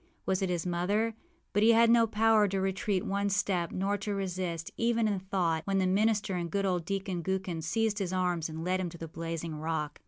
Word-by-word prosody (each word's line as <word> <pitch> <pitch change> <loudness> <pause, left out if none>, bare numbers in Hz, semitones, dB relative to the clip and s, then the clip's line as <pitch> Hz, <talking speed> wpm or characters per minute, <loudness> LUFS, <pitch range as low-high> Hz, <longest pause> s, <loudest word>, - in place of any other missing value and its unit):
Was 190 0 0
it 190 - 0
his 175 -1 -1
mother? 200 +6 0 0.4
But 205 - +2
he 230 +2 +6
had 230 0 +5
no 230 -1 +5
power 220 -1 +4
to 195 0 -1
retreat 190 0 -1
one 200 +1 0
step, 190 -4 0
nor 200 +2 -1
to 205 +1 -3
resist, 180 -4 -3
even 230 -1 +1
in 200 -2 0
thought, 180 -4 0
when 195 0 +1
the 190 - +2
minister 205 +1 +2
and 175 -2 -2
good 200 +3 0
old 180 -3 0
Deacon 195 -2 -2
Gookin 190 -2 -2
seized 215 +6 0
his 190 -3 -2
arms 180 -3 0
and 160 +1 -6
led 185 +2 0
him 180 -2 -2
to 170 - -11
the 165 - -6
blazing 165 0 -5
rock. 155 -1 -3
190 Hz, 220 wpm, -30 LUFS, 170-205 Hz, 0.4 s, he